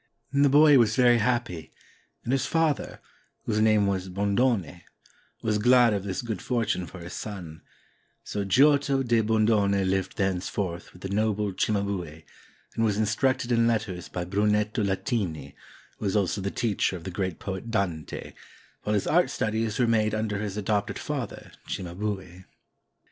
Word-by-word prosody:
The 140 0 +4
boy 145 0 +7
was 110 -2 +3
very 120 -2 +5
happy, 115 -8 -1 0.5
and 120 - -2
his 135 - +1
father 165 -3 0 0.2
— - - -41
whose 105 -1 0
name 110 -2 +4
was 95 -1 -1
Bondone 100 -1 0 0.3
— - - -35
was 105 -1 +1
glad 120 0 +5
of 100 -2 -2
this 95 +3 -3
good 110 -6 -4
for 120 -3 0
tune 90 -4 -2
for 90 - -10
his 85 +1 -8
son; 90 -7 -7 0.6
so 100 - -3
Giotto 140 +5 +3
di 120 -2 +2
Bondone 105 -3 +2
lived 95 0 -1
thenceforth 95 -2 -2
with 90 - -16
the 95 - -4
noble 105 0 0
Cimabue, 95 -6 -2 0.5
and 115 - -1
was 105 -2 +1
instructed 125 +4 +1
in 115 -1 +3
letters 105 -6 -2
by 90 - -4
Brunetto 105 +3 +1
Latini, 95 - -2 0.5
who - - -5
was 95 - 0
also 100 -1 +1
the 100 - -2
teacher 105 -3 0
of 85 - -12
the 95 - -5
great 95 -2 -3
poet 100 +3 -6
Dante, 95 -8 -3 0.5
while 105 - -1
his 100 - 0
art 175 +3 +3
studies 110 0 -1
were 125 - +3
made 110 -2 +2
under 110 -2 -2
his 105 -1 -4
adopted 105 0 -1
father, - - -5 0.2
Cimabue. 95 0 -5
105 Hz, 165 wpm, -26 LUFS, 95-115 Hz, 0.6 s, boy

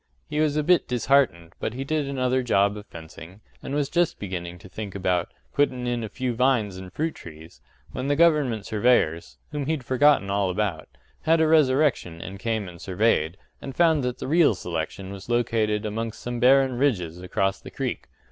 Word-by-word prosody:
He 150 -1 -3
was 155 -1 +2
a 150 - +1
bit 175 +2 +3
disheartened, 120 -9 +1
but 110 - -3
he 135 - -3
did 150 0 -1
another 130 -1 0
job 100 -4 +2
of 105 0 -9
fencing, 85 +3 -11 0.2
and 140 - -4
was 145 -1 +1
just 175 +3 +1
beginning 90 -3 -5
to 90 - -14
think 100 +1 -7
about 90 -2 0 0.2
“puttin' 130 -3 +1
in 120 -1 -1
a 110 - -5
few 125 +3 -3
vines 115 -6 +1
an' 95 0 -9
fruit 155 - -2
trees” 80 0 -13 0.3
when 130 - -4
the 145 - +2
government 145 -10 +3
surveyors 105 -8 +1
whom 145 -2 -3
he'd 155 -5 -2
forgotten 130 -4 +4
all 100 -1 +1
about 90 -4 -2 0.3
had 165 +1 +3
a 160 - +4
resurrection 140 - +2
and 95 +3 -8
came 110 -3 -2
and 85 -2 -11
surveyed, 95 -4 +1 0.2
and 135 - -7
found 160 -4 +4
that 125 -1 -2
the - - -6
real 155 - +4
selection 90 +2 -5
was 100 +3 -10
located 110 -3 +1
amongst 110 +1 -4
some 120 0 -4
barren 130 0 +4
ridges 90 - 0
across 95 +2 -1
the - - -10
creek. - - -4
115 Hz, 190 wpm, -25 LUFS, 95-140 Hz, 0.3 s, forgotten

